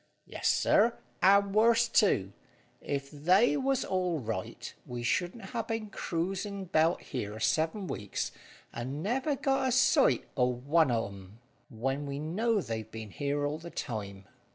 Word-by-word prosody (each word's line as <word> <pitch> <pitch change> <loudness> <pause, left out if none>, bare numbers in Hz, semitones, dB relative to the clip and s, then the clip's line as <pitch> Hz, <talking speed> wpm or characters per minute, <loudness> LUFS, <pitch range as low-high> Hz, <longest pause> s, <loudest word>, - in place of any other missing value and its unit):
"Yes, - - -3
sir, 230 +3 +3 0.2
and 200 +1 +5
worse 230 +2 +4
too. 100 - +2 0.5
If 140 -1 -3
they 180 - +3
was 270 -2 0
all 180 -3 0
right, 110 -8 -5
we 120 -1 -5
shouldn't 180 - -1
ha' 230 -2 -2
been 225 -2 -3
cruising 195 +3 -3
'bout 165 0 +2
here 110 -5 -5
seven 160 - 0
weeks, 105 - -3 0.4
and 130 +6 -4
never 265 +8 0
got 270 0 +1
a - - +1
sight 255 +3 +4
o' 125 - +3
one 140 +5 +2
of 115 -4 -1
'em, 95 +2 -13 0.3
when 135 +4 -2
we 140 0 -4
know 205 +9 0
they've 110 - -5
been 110 -2 -8
here 145 +3 -1
all 150 +2 -2
the 170 +1 -9
time." 100 -9 -5
160 Hz, 155 wpm, -30 LUFS, -, 0.5 s, and